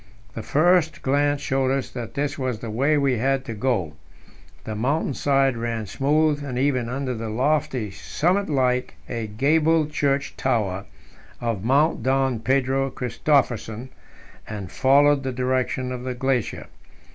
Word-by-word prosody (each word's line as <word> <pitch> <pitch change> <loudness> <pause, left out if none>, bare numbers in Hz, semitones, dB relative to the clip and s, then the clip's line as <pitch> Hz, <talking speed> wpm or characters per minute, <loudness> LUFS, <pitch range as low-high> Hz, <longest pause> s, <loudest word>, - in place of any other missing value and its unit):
The 115 - -5
first 165 +6 +2
glance 145 +1 +1
showed 135 -1 0
us 135 -1 -1
that 115 -3 -7
this 145 0 -1
was 130 -4 -2
the 115 0 -6
way 140 +7 +2
we 135 -4 +1
had 135 +2 0
to 115 - -5
go. 105 - -1 0.7
The 110 - -5
mountain 135 +7 0
side 135 -1 +2
ran 115 -1 -3
smooth 145 +6 +1
and 130 -3 -4
even 130 -3 +1
under 130 0 -2
the 115 -1 -5
lofty 130 -2 0
summit 185 - -1
like 125 -3 0
a 115 -2 -4
gabled 155 +7 +2
church 140 -1 0
tower 105 -7 -1 0.5
of 115 -5 -2
Mount 140 +7 +2
Don 130 -2 +1
Pedro 135 +2 +1
Christophersen, 125 -2 -1 0.6
and 105 -4 -6
followed 140 +1 +4
the 135 -1 -3
direction 130 0 -1
of 125 -1 -4
the 130 -1 -3
glacier. 130 -2 -1
130 Hz, 145 wpm, -23 LUFS, 120-140 Hz, 0.7 s, followed